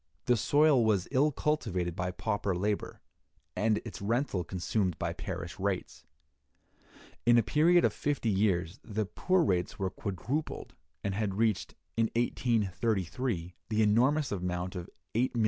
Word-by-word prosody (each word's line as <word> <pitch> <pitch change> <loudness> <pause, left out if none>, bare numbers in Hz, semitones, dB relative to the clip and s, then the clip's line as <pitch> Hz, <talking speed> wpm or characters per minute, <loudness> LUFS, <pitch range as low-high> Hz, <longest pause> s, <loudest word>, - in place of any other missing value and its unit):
The 125 - +4
soil 145 +2 +4
was 105 -4 +2
ill 145 +3 +3
cultivated 95 - -1
by 90 0 -1
pauper 100 0 -1
labor, 100 +3 -2 0.5
and 110 0 +2
its 115 - -7
rental 110 -3 0
consumed 90 +1 -1
by 85 0 -2
parish 90 0 -6
rates. 95 -1 -3 1.2
In 120 0 +5
a 115 - +5
period 170 +8 +4
of - - +2
fifty 140 -6 0
years, 95 -1 +1
the 110 0 -2
poor 185 - +1
rates 90 - 0
were 95 -1 -1
quadrupled, 115 - -4 0.3
and 100 - -1
had 100 -1 -1
reached, 110 -3 0 0.2
in 115 +1 +3
1833, 110 -4 0 0.2
the 110 0 +2
enormous 130 +8 +3
amount 90 -1 -2
of 90 0 -6 0.2
£8,600,000. 120 +1 +1
105 Hz, 140 wpm, -30 LUFS, 90-120 Hz, 1.2 s, In